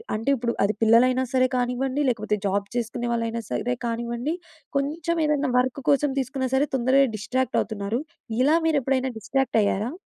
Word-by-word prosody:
అంటే, 225 +5 -2
ఇప్పుడు 235 -2 -2
అది 205 +2 +2
పిల్లలైనా 250 +3 +5
సరే 255 0 +4
కానివ్వండి, 255 +3 0
లేకపోతే 215 -3 -1
జాబ్ 200 +1 -1
చేసుకునే 240 0 -2
వాళ్ళైనా 230 0 -2
సరే 245 0 -1
కానివ్వండి, 235 +6 -2 0.4
కొంచెం 310 +4 -1
ఏదైనా 295 -3 +1
వర్క్ 260 +2 -1
కోసం 285 0 +2
తీసుకున్న 260 0 -2
సరే, 280 +3 +2
తొందరగా 265 +2 +4
డిస్ట్రాక్ట్ 255 +4 -1
అవుతున్నారు. 215 +3 -3 0.4
ఇలా 305 +4 +4
మీరు 310 -3 +3
ఎప్పుడైనా 265 0 0
డిస్ట్రాక్ట్ 260 +2 0
అయ్యారా? 205 +4 0
250 Hz, 155 wpm, -24 LUFS, 230-270 Hz, 0.4 s, పిల్లలైనా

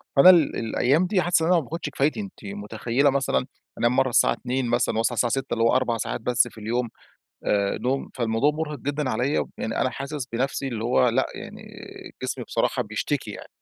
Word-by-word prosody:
فأنا 140 +6 +9
ال 170 -5 +5
الأيام 130 +9 +1
دي 185 -1 +2
حاسس 175 -2 +2
إن 160 - +1
أنا 180 - +4
ما 165 - +2
باخدش 155 +2 -5
كفايتي. 145 +7 0
أنتِ 200 - -8
مُتخيّلة 110 +7 0
مثلًا 135 -2 0 0.3
أنام 120 +2 +2
مرّة 130 -1 +3
الساعة - - +4
02:00 130 0 -2
مثلًا 120 -2 +1
وأصحى 115 +2 +1
الساعة 120 +1 +1
06:00 135 0 -1
اللي 115 - +1
هو 115 - +4
4 125 -3 +1
ساعات 110 - -3
بس 125 +1 +2
في - - -14
اليوم 120 +2 -1 0.6
آآ 100 -1 +1
نوم. 135 +2 -1
فالموضوع 115 +4 +1
مُرهق 150 -2 -4
جدًا 145 +1 -2
عليّا. 125 +5 0
يعني 110 - -2
أنا 130 - +2
حاسس 140 +1 -5
بنفسي 135 +2 -1
اللي 115 -3 -4
هو 125 +1 +3
لأ 130 +3 +1
يعني - - -9 0.6
جسمي - - -3
بصراحة - - 0
بيشتكي - - -3
يعني. - - -9
130 Hz, 205 wpm, -24 LUFS, 115-145 Hz, 0.6 s, فأنا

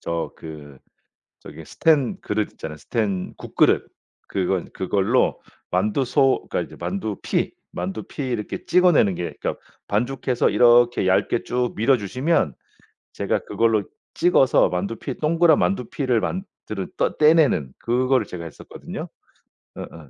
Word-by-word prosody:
저 85 0 -3
그 75 -4 -10 0.6
저기 - - -11
스텐 150 -6 +1
그릇 105 0 -2
있잖아요 75 -1 -7
스텐 100 -1 -2
국그릇. - - +1 0.4
그거 95 -1 -1
그걸로 100 +6 +1 0.3
만두소 130 +8 +1
그러니까 - - -1
이제 - - -13
만두피 100 +4 -2 0.2
만두피 95 +9 -5
이렇게 120 -5 -4
찍어내는 175 - +4
게 85 - -4
그니까 - - -2 0.3
반죽해서 125 +3 0
이렇게 120 -3 +5
얇게 95 +4 +2
쭉 125 -1 -1
밀어주시면 125 - +1 0.6
제가 - - -1
그걸로 115 -2 +1 0.3
찍어서 165 -6 +4
만두피 100 +8 -3
동그란 165 0 +4
만두피를 120 +6 0
만드는 110 - -5
떠 - - 0
떼내는 150 - +4
그거를 125 0 +1
제가 85 -3 -7
했었거든요. 80 - -8 0.7
어어. 80 -4 -10
115 Hz, 300 characters per minute, -23 LUFS, 95-130 Hz, 0.7 s, 이렇게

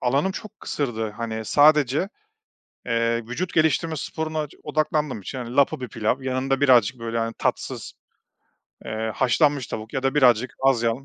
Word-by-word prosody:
alanım 140 +9 +1
çok 215 +1 -9
kısırdı, 115 -6 -2
hani, 110 0 -5
sadece, 150 - +4 0.8
eee, 115 0 0
vücut 175 +9 -4
geliştirme 160 +1 +2
sporuna 155 +1 -3
ç - - -18
odaklandığım 150 -5 -1
için, 130 - -6
hani, 120 +1 -6
lapa 140 -2 +3
bir 125 - -4
pilav 115 +7 -1
yanında 130 +1 -1
birazcık, 125 -3 +4
böyle, 115 0 -3
hani, 115 0 -1
tatsız, - - -3 0.9
eee, 110 +1 -3
haşlanmış 140 +1 +2
tavuk 110 +1 -7
ya 130 - -2
da 135 +1 0
birazcık 125 -3 +4
az 135 -4 +4
yağlı 115 +3 -1
130 Hz, 160 wpm, -24 LUFS, 115-150 Hz, 0.9 s, sadece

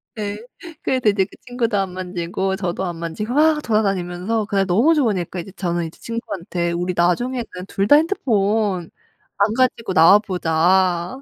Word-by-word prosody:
네. 210 -2 -4 0.4
그래서 255 -5 +1
이제 200 -2 +2
그 - - -17
친구도 240 -4 -1
안 195 -2 -1
만지고 185 +1 -3
저도 190 -1 -3
안 175 -2 -4
만지고 170 +8 -4
막 305 +1 +3
돌아다니면서 200 0 -1
그날 195 -1 0
너무 225 - +3
좋으니까 200 - 0
이제 175 +3 -8
저는 175 -3 -2
이제 160 - -10
친구한테 180 -7 -4
"우리 175 +1 -2
나중에는 235 +9 0 0.2
2 195 +1 -1
다 290 - +7
핸드폰 210 - 0 0.5
안 205 +2 +2
가지고 240 -4 0
나와 180 +4 +7
보자. 180 +2 +1
195 Hz, 335 characters per minute, -20 LUFS, 175-225 Hz, 0.5 s, 다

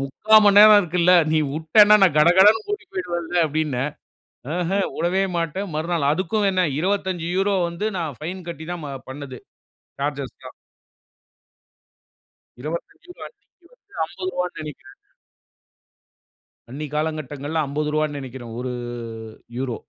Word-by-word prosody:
முக்கா 210 +11 +3
மணி 205 0 +6
நேரம் 210 0 +9
இருக்கில்ல. 175 0 +2 0.2
நீ 160 - +3
விட்டனா 160 +8 +5
நான் 175 -6 +4
கடகடனு 190 +8 +6
கூட்டி 415 0 -3
போய்டுவேல்ல 175 -2 -4
அப்படின. 155 -2 -2 0.8
ஆஹ, 175 0 -2 0.2
உடவே 180 +4 0
மாட்டேன். 170 +4 -2
மறுநாள் 160 -2 0
அதுக்கும் 190 +6 0
என்ன, 185 -1 +1 0.2
25 190 +1 -1
வந்து 170 +5 -5
நான் 160 -6 -4
ஃபைன் 175 +3 -6
கட்டி 160 -1 -7
தான் 170 -4 -7 0.2
பண்ணது 135 -1 -8 0.6
சார்ஜ்ஜஸ்ல்லாம். 140 -3 -5 2.1
25 170 - -7
அன்னைக்கு 360 -7 -29
வந்து - - -25
ரூ.50னு 180 +1 -4
நினைக்கிறேங்க. 150 -2 -10 1.7
அன்னைக்கு 150 +2 -7
காலகட்டங்கள்ல 155 0 -2
ரூ.50னு 150 +1 -1
நெனைக்கிறேங்க. 120 -3 -8
1 125 -1 -4 0.8
யூரோ. 125 -3 -3
165 Hz, 110 wpm, -22 LUFS, 150-190 Hz, 2.1 s, நேரம்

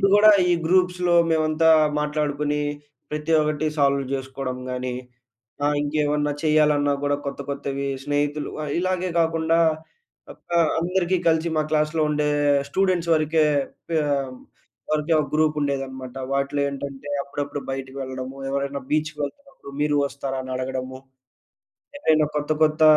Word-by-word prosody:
అప్పుడు 195 - +5
కూడా 215 +1 +8 0.2
ఈ - - +5
గ్రూప్స్‌లో 180 0 +2 0.2
మేమంతా 160 0 +3 0.3
మాట్లాడుకొని 150 0 -1 0.5
ప్రతి 150 +2 -2
ఒక్కటి 150 0 0
సాల్వ్ 140 -1 +3
చేసుకోవడం 130 -1 -4
గాని, 125 0 -3 0.7
ఆ! - - +3 0.2
ఇంకేమన్నా 150 0 0
చేయాలన్నా 150 -2 +3
కూడా 145 0 +2
కొత్త 140 0 -4
కొత్తవి 140 0 -3 0.2
స్నేహితులు 145 +1 -1 0.3
ఇలాగే 185 0 -1
కాకుండా 165 0 +2 0.7
ఒక - - -15 0.3
అందరికి 180 +1 +1
కలిసి 160 +1 +2
మా 155 - +3
క్లాస్‌లో 155 +1 +1
ఉండే 150 0 +1 0.4
స్టూడెంట్స్ 180 0 +1
వరకే 155 0 +2 0.5
పిహ్ 160 -2 +1 0.9
వరకే 155 +2 0
ఒక 150 - -2
గ్రూప్ 155 0 +2
ఉండేది 140 -1 0
అన్నమాట. 130 -1 -9 0.2
వాటిలో 140 +1 0
ఏంటంటే 140 0 -6
అప్పుడప్పుడు 145 0 -4
బయటికి 135 0 -5
వెళ్ళడము. 130 0 -6
ఎవరైనా 140 0 -2
బీచ్‌కి 155 0 0
వెళ్తున్నప్పుడు 265 - -8
మీరు 150 0 +2
వస్తారా? 135 -1 -4
అని 130 0 -6
అడగడము. 130 0 -4 1.0
ఏమైనా 155 - +3
కొత్త 150 +1 0
కొత్త 155 0 +3
150 Hz, 130 wpm, -23 LUFS, 140-160 Hz, 1.0 s, కూడా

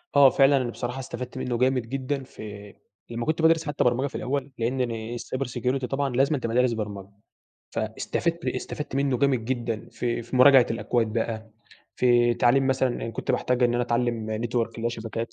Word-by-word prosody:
آه 140 -2 +8
فعلًا. 135 +1 +4
أنا 125 -2 -1
بصراحة 125 +3 -4
استفدت 125 0 -6
منّه 125 -2 -2
جامد 125 -2 +1
جدًا 135 0 -2
في 105 -5 -10 0.4
لمّا 115 0 -4
كنت 160 +1 0
بادرس 165 0 +4
حتّى 145 - 0
برمجة 125 +3 +2
في - - -10
الأول، 140 +1 -2
لإن 125 +3 -1
أنا 115 0 -3
الcyber 130 +3 -4
security 125 +1 -1
طبعًا 135 +2 -1
لازمًا 140 +3 +3
تبقى 115 -2 -3
دارس 125 -1 +3
برمجة. 100 -3 -5 0.7
فاستفدت 165 +10 -2
ب - - +2
استفدت 150 -3 -4
منّه 140 -3 +1
جامد 135 -5 +2
جدًا 120 -3 -3
في 120 -1 -2
في 125 +3 -5
مراجعة 130 -1 +7
الأكواد 115 0 0
بقى، 110 -1 -3 0.5
في 120 -1 +4
تعليم 135 +4 +3
مثلًا 130 -1 +2
أنا 115 -1 -4
كنت - - -4
باحتاج 125 0 +1
إن 120 0 +3
أنا 120 - +1
اتعلّم 120 -2 -1 0.2
network 120 - -5 0.2
اللي 115 - -5
هو - - +3
شبكات. 115 0 -5
125 Hz, 190 wpm, -25 LUFS, 115-135 Hz, 0.7 s, آه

